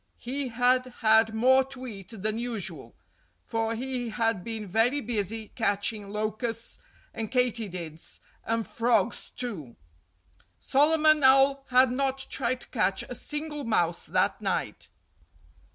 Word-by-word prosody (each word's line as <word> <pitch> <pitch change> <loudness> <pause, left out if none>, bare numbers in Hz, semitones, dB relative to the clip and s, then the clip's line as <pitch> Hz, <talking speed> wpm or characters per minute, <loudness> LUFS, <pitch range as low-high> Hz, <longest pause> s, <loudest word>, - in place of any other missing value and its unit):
He 270 +3 -3
had 250 +2 +2 0.2
had 220 0 +4
more 260 +4 +5
to 265 -1 -9
eat 200 -6 -8
than 215 +1 0
usual; 235 -5 -4 0.5
for 225 0 -1
he 250 0 -3
had 225 -4 0
been 220 -1 -4
very 225 +8 +2
busy 220 -3 -3
catching 205 -1 -1
locusts 215 +2 -3 0.3
and 225 -1 -4
katydids—and 220 -2 -3
frogs, 230 -2 +1
too. 175 - -4 0.8
Solomon 310 +1 +4
Owl 270 +1 +5
had 255 0 +5
not 270 +1 0
tried 255 -1 0
to - - -12
catch 195 -5 0
a - - -7
single 295 +3 -4
mouse 175 -8 0
that - - +1
night. - - -2
230 Hz, 120 wpm, -27 LUFS, 215-255 Hz, 0.8 s, more